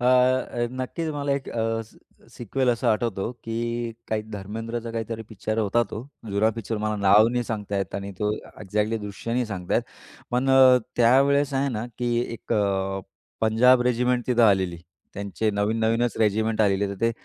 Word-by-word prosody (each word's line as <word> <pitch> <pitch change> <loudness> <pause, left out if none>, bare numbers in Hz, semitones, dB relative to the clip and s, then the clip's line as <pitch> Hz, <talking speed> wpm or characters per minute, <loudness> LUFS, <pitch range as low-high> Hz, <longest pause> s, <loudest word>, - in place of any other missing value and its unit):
अ, 125 - -2
अ, 125 -1 +3
नक्कीच 160 +6 -3
मला 145 -1 -1
एक 140 -1 -3
अ, 115 0 -1 0.5
सिक्वेल 125 +3 -1
असं 120 +1 -1
आठवतो, 110 -2 0
की 115 +1 -3 0.2
काही 110 -1 -1
धर्मेंद्रचा 115 +4 -5
काहीतरी 115 0 -4
पिक्चर 110 0 -3
होता 110 +2 +2
तो. 120 +6 -7 0.2
जुना 100 +2 +2
पिक्चर 115 0 -3
मला 110 0 0
नाव 100 +2 +5
नाही 120 0 -1
सांगता 105 -3 -3
येत 95 -3 -4
आणि 100 0 -4
तो 105 0 0
एक्झॅक्टली 105 +2 -3
दृश्य 105 +2 -6
नाही 125 0 +1
सांगता 95 -5 -3
येत. - - +3 0.5
पण 125 +2 +1
अ, 130 -1 +7 0.2
त्यावेळेस 135 +4 +4
आहे 135 +1 +1
ना, 115 -3 -3
की 120 -1 0
एक 115 - -6
अ, 95 -1 0 0.4
पंजाब 120 +3 +5
रेजिमेंट 125 0 +1
तिथं 120 -2 +3
आलेली. 95 -4 +3 0.4
त्यांचे 100 +2 -2
नवीन-नवीनच 110 +3 0
रेजिमेंट 110 +1 +1
आलेली. 100 -1 +2
तर 100 - -4
ते 115 - +3
115 Hz, 165 wpm, -25 LUFS, 105-120 Hz, 0.5 s, अ